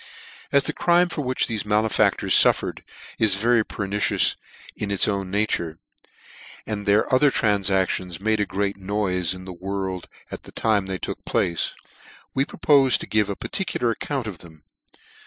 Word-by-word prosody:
AS 140 -1 +4
the - - -1
crime 175 +1 +3
for 160 - -3
which 130 -2 0
thefe 110 -3 -2
malefactors 105 +1 +1
fuffered - - +4 0.4
is 110 -3 +4
very 115 +3 +2
pernicious 100 0 0 0.4
in 105 - -4
its 100 -1 +3
own 100 -2 -2
nature, 90 -5 -1 0.9
and 105 -1 -5
their 105 +5 +2
other 140 +3 +5
tranfactions 95 -5 0
made 110 +2 +1
a 105 - 0
great 100 0 -2
noife 95 -3 0
in 90 0 -10
the 95 - -7
world 95 0 -4 0.2
at - - -7
the - - -14
time 105 -3 0
they 95 -1 -3
took - - -6
place, 85 - 0 0.6
we 135 - +2
propofe 140 -5 +3
to - - -7
give 105 -1 +1
a 100 - -2
particular 125 - -2
account 135 +2 -3
of 100 -7 -7
them. 80 -3 -15
105 Hz, 160 wpm, -23 LUFS, 95-115 Hz, 0.9 s, other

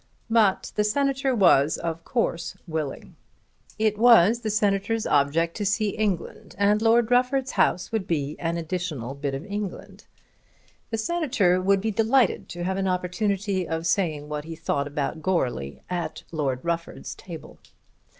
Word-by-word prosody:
But 215 -4 +3
the 210 - +2
Senator 270 +3 +1
was 160 - +4
of 165 -1 -4
course 175 -6 -2
willing. 155 -4 -5 0.6
It 215 -1 +1
was 230 -2 +6
the 220 - -3
Senator's 210 +1 +1
object 150 +4 +2
to 210 - -2
see 205 +1 +1
England, 200 -4 -3
and 205 +2 +3
Lord 230 +1 +3
Rufford's 255 +2 +2
house 180 - +1
would 220 -4 -2
be 150 -2 -1
an 170 0 -1
additional 160 -7 -4
bit 140 -1 -3
of 140 +6 -6
England. 205 -1 -6 0.8
The 225 - -2
Senator 225 - +1
would 195 +1 +3
be 220 +2 -1
delighted 225 +1 +2
to 175 0 -5
have 190 +2 -1
an 195 0 0
opportunity 185 +1 -1
of 165 0 -3
saying 160 -4 0
what 150 0 -4
he 165 0 -7
thought 145 -3 -1
about 145 +2 -3
Goarly 130 - -1
at 175 -1 -4
Lord 140 -5 -2
Rufford's 170 0 -3
table. 165 -4 -10
185 Hz, 150 wpm, -25 LUFS, 165-215 Hz, 0.8 s, was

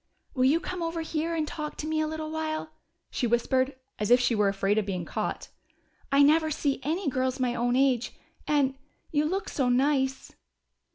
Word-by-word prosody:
"Will 255 -2 +2
you 295 +5 +4
come 365 0 -5
over 330 0 -2
here 325 +1 -2
and 310 -2 -1
talk 300 0 -5
to - - -4
me 310 0 0
a 310 - 0
little 315 0 -4
while?" 315 0 -3 0.4
she 245 - 0
whispered, 260 +3 +1 0.2
as 210 - -1
if 245 +1 +7
she 245 -1 +2
were 210 -2 +3
afraid 195 +2 +1
of 210 - -2
being 180 -3 -3
caught. - - -4 0.6
"I 280 +1 +6
never 315 +2 +4
see 285 -2 -1
any 320 +7 -2
girls 260 0 0
my 250 -1 +1
own 245 +1 0
age 255 -2 +2 0.4
and 285 -3 +2 0.4
you 300 0 +2
look 380 +5 -1
so 260 -3 0
nice!" 265 +1 +1
280 Hz, 190 wpm, -28 LUFS, 250-315 Hz, 0.6 s, if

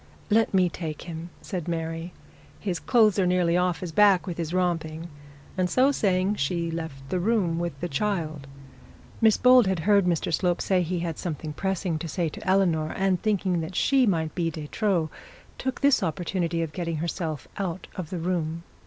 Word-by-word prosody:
'Let 225 +1 +4
me 185 -2 +4
take 160 -3 -5
him,' 170 0 -7
said 180 -4 -4
Mary. 165 0 -3 0.5
'His 185 -5 -2
clothes 215 -5 +3
are 185 - +3
nearly 180 -1 +2
off 180 -3 +1
his 175 - -4
back 195 +1 +5
with 175 -3 -5
his 165 -1 -2
romping,' 170 -2 -1 0.5
and 185 -1 0
so 260 +8 +4
saying 195 -4 +1
she 170 +4 -1
left 160 -5 -6
the 185 - 0
room 180 -4 +1
with 170 -5 -3
the 175 - -1
child. 155 -4 -2 0.7
Miss 220 -2 +5
Bold 250 -3 +6
had 190 -3 0
heard 200 +2 +4
Mr 170 -2 0
Slope 175 +2 +1
say 185 -2 +2
he 175 0 -2
had 165 -3 -3
something 155 -3 -4
pressing 185 -1 -2
to 165 - -5
say 165 +1 -1
to - - -10
Eleanor, 170 -5 +2
and 190 -2 +1
thinking 190 -5 +1
that 165 +3 -6
she 265 +2 +3
might 160 -5 0
be 170 -2 0
de 155 -2 -6
trop, 180 -7 0 0.5
took 260 0 -3
the 280 -1 +5
opportunity 170 0 -1
of 155 -2 -5
getting 170 -1 -3
herself 160 -2 -3
out 185 -2 -3
of 175 -5 -5
the 185 - -4
room. 170 -1 -2
175 Hz, 190 wpm, -26 LUFS, 165-190 Hz, 0.7 s, Bold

